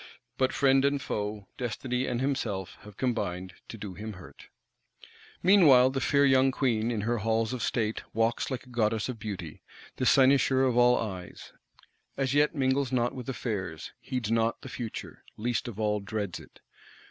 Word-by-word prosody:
But 130 Hz, 0 st, +1 dB
friend 135 Hz, -1 st, +3 dB
and 140 Hz, 0 st, +2 dB
foe, 105 Hz, -5 st, -4 dB
destiny 125 Hz, +1 st, -2 dB
and 120 Hz, -1 st, -1 dB
himself 115 Hz, -9 st, -2 dB
have 105 Hz, -1 st, -14 dB
combined 95 Hz, -7 st, -2 dB
to 115 Hz, -, -8 dB
do 100 Hz, -3 st, -7 dB
him 110 Hz, +3 st, -7 dB
hurt. 90 Hz, -1 st, -13 dB, 1.0 s
Meanwhile 150 Hz, -10 st, +6 dB
the 135 Hz, 0 st, -2 dB
fair 140 Hz, 0 st, +3 dB
young 130 Hz, -1 st, +5 dB
Queen, 120 Hz, -4 st, 0 dB
in 115 Hz, -3 st, -1 dB
her 115 Hz, +2 st, 0 dB
halls 110 Hz, +2 st, 0 dB
of 125 Hz, -, -4 dB
state, 110 Hz, -2 st, -1 dB
walks 115 Hz, +1 st, 0 dB
like 130 Hz, -3 st, -4 dB
a 125 Hz, -, -18 dB
goddess 110 Hz, -1 st, 0 dB
of 120 Hz, -3 st, -5 dB
Beauty, 100 Hz, -8 st, -6 dB, 0.4 s
the 130 Hz, -, 0 dB
cynosure 135 Hz, -1 st, +5 dB
of 130 Hz, -2 st, +2 dB
all 125 Hz, 0 st, +5 dB
eyes; 95 Hz, -5 st, -6 dB, 0.6 s
as 135 Hz, -1 st, 0 dB
yet 150 Hz, +2 st, +3 dB
mingles 135 Hz, -1 st, +1 dB
not 125 Hz, 0 st, +1 dB
with 130 Hz, -1 st, -7 dB
affairs; 100 Hz, -10 st, -4 dB
heeds 125 Hz, -4 st, -3 dB
not 115 Hz, 0 st, +1 dB
the 130 Hz, -, -7 dB
future; 120 Hz, -3 st, -7 dB
least 120 Hz, +3 st, -1 dB
of 110 Hz, -3 st, -7 dB
all, 105 Hz, -1 st, +1 dB
dreads 100 Hz, -2 st, -4 dB
it. -, -, -17 dB
120 Hz, 170 wpm, -28 LUFS, 105-130 Hz, 1.0 s, Meanwhile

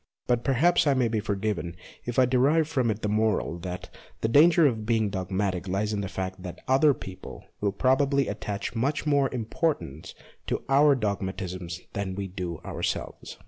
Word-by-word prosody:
But 120 Hz, -1 st, +1 dB
perhaps 150 Hz, +5 st, +3 dB
I 140 Hz, -, +4 dB
may 125 Hz, -2 st, +2 dB
be 110 Hz, -1 st, 0 dB
forgiven 100 Hz, -4 st, -2 dB, 0.3 s
if 120 Hz, -, -4 dB
I 130 Hz, -, +6 dB
derive 140 Hz, +5 st, +3 dB
from 130 Hz, -7 st, 0 dB
it 110 Hz, 0 st, -2 dB
the -, -, +1 dB
moral 105 Hz, -5 st, 0 dB
that 90 Hz, +1 st, -6 dB, 0.3 s
the -, -, +1 dB
danger 160 Hz, +6 st, +6 dB
of 115 Hz, -6 st, +1 dB
being 110 Hz, -2 st, +1 dB
dogmatic 95 Hz, -1 st, -2 dB
lies 100 Hz, +3 st, -1 dB
in 100 Hz, -, -1 dB
the 100 Hz, -, -4 dB
fact 95 Hz, -1 st, -4 dB
that 90 Hz, -2 st, -7 dB
other 135 Hz, +2 st, +4 dB
people 95 Hz, -1 st, -9 dB
will 100 Hz, -1 st, +1 dB
probably 135 Hz, +5 st, +2 dB
attach 100 Hz, 0 st, -4 dB
much 135 Hz, +7 st, -1 dB
more 140 Hz, -3 st, +2 dB
importance 115 Hz, -, -2 dB, 0.3 s
to -, -, -2 dB
our 140 Hz, +1 st, +6 dB
dogmatisms 95 Hz, -5 st, -3 dB
than 95 Hz, -2 st, -3 dB
we 100 Hz, 0 st, -3 dB
do 90 Hz, -3 st, -5 dB
ourselves. -, -, -4 dB
110 Hz, 175 wpm, -27 LUFS, 95-135 Hz, 0.3 s, I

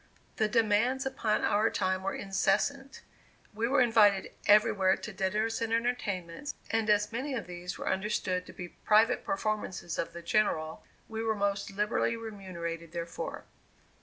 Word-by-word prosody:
The 215 Hz, -, +2 dB
demands 230 Hz, +4 st, +2 dB
upon 220 Hz, -5 st, 0 dB
our 215 Hz, +2 st, +3 dB
time 185 Hz, 0 st, 0 dB
were 195 Hz, +1 st, -2 dB
incessant. 215 Hz, +8 st, 0 dB, 0.5 s
We 225 Hz, +2 st, 0 dB
were 265 Hz, +1 st, +3 dB
invited 215 Hz, -5 st, +4 dB, 0.2 s
everywhere 200 Hz, -2 st, +5 dB
to 215 Hz, -, -7 dB
dinners 210 Hz, +5 st, -1 dB
and 225 Hz, -1 st, -1 dB
entertainments, 230 Hz, 0 st, -2 dB, 0.2 s
and 225 Hz, -1 st, +1 dB
as 210 Hz, +1 st, +3 dB
many 260 Hz, +4 st, -3 dB
of 230 Hz, -, -3 dB
these 180 Hz, +1 st, -6 dB
were -, -, -6 dB
understood 190 Hz, -2 st, -1 dB
to -, -, -10 dB
be 175 Hz, -1 st, -7 dB
private 220 Hz, +6 st, +3 dB
performances 215 Hz, -, -2 dB
of 165 Hz, 0 st, -2 dB
the 170 Hz, 0 st, -8 dB
General, 165 Hz, -5 st, 0 dB, 0.2 s
we 220 Hz, 0 st, -4 dB
were 220 Hz, -1 st, 0 dB
most 200 Hz, 0 st, -1 dB
liberally 210 Hz, +3 st, 0 dB
remunerated 170 Hz, -7 st, -6 dB
therefor. 170 Hz, -1 st, -5 dB
210 Hz, 150 wpm, -30 LUFS, 185-225 Hz, 0.5 s, everywhere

